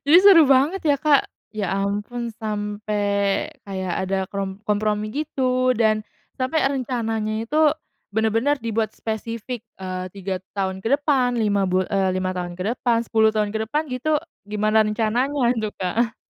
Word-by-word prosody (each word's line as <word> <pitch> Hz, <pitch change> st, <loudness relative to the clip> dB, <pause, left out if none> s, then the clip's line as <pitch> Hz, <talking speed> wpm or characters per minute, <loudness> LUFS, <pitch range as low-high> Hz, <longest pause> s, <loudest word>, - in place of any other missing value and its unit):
jadi 300 Hz, +4 st, +7 dB
seru 380 Hz, -5 st, +8 dB
banget, 275 Hz, +8 st, +3 dB
ya, 290 Hz, -2 st, +4 dB
Kak. 295 Hz, -3 st, +5 dB, 0.3 s
Ya, 200 Hz, -4 st, -1 dB
ampun, 205 Hz, +5 st, -2 dB
sampai, 205 Hz, -1 st, -1 dB, 0.2 s
kayak 190 Hz, -2 st, -4 dB
ada, 190 Hz, +1 st, -1 dB
krom 195 Hz, 0 st, -4 dB
kompromi 210 Hz, 0 st, 0 dB
gitu, 255 Hz, -1 st, 0 dB
dan 215 Hz, -2 st, +2 dB, 0.3 s
sampai 265 Hz, +4 st, 0 dB
rencananya 230 Hz, -5 st, -2 dB
itu 230 Hz, +7 st, -3 dB, 0.6 s
benar-benar 225 Hz, +6 st, +1 dB
dibuat 220 Hz, -1 st, -1 dB
spesifik, 230 Hz, +1 st, -5 dB, 0.2 s
eee, 185 Hz, -1 st, -4 dB
3 195 Hz, -1 st, -4 dB, 0.2 s
tahun 190 Hz, -1 st, -3 dB
ke -, -, +1 dB
depan, 270 Hz, -4 st, +2 dB
5 205 Hz, -2 st, +2 dB
bul 185 Hz, 0 st, 0 dB
eee, 195 Hz, -2 st, +1 dB
5 185 Hz, 0 st, -1 dB
tahun 175 Hz, -1 st, -3 dB
ke 185 Hz, -, -2 dB
depan, 240 Hz, -2 st, +2 dB
10 220 Hz, -1 st, +4 dB
tahun 215 Hz, -1 st, +1 dB
ke 220 Hz, 0 st, 0 dB
depan, 300 Hz, +7 st, -2 dB
gitu, 290 Hz, +4 st, 0 dB, 0.2 s
gimana 215 Hz, +1 st, +2 dB
rencananya 235 Hz, +5 st, +1 dB
itu, 215 Hz, -2 st, -2 dB
Kak? 220 Hz, +5 st, 0 dB
220 Hz, 150 wpm, -23 LUFS, 200-255 Hz, 0.6 s, seru